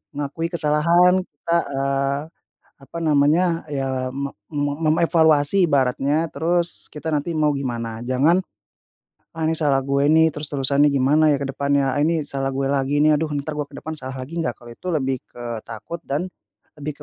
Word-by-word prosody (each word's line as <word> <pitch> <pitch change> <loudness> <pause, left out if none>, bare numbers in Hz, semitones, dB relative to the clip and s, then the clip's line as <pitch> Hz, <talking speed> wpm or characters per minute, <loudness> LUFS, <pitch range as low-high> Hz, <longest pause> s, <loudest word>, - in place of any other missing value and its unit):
mengakui 145 +3 -3
kesalahan 170 +4 +3
kita, 170 -2 -2 0.2
eee, 140 +1 0 0.6
apa 140 +5 -9
namanya, 165 +3 +2
ya 130 -2 -2
me 140 +1 -4 0.2
me 145 -1 -1 0.2
memevaluasi 160 +1 +3
ibaratnya, 140 +3 +1
terus 170 +3 -1
kita 155 +1 -9
nanti 150 +3 -1
mau 150 -1 +2
gimana. 115 -4 -4
Jangan, 145 +9 +2 0.9
"Ah 160 - -4
ini 160 - +2
salah 140 -4 +2
gue 140 +1 +1
ini, 160 +1 +5
terus-terusan 145 -1 +1
nih 140 -2 +2
gimana 155 +4 +4
ya - - 0
ke 140 - -2
depannya, 140 0 +1
ah, - - -1
ini 160 +1 +2
salah 135 -1 -1
gue 135 0 -1
lagi 140 +1 0
ini, 155 - +5
aduh 155 +2 0
ntar 155 +1 -5
gue 145 - -2
ke 145 - -18
depan 160 - -6
salah 130 -1 -7
lagi 165 +6 -7
nggak?" 125 -6 -1
Kalau 120 -1 -13
itu 185 - -9
lebih 135 -3 0
ke 120 -1 -6
takut 115 +9 -7
dan 150 +7 -2 0.5
lebih 150 0 -6
145 Hz, 175 wpm, -22 LUFS, 135-160 Hz, 0.9 s, ini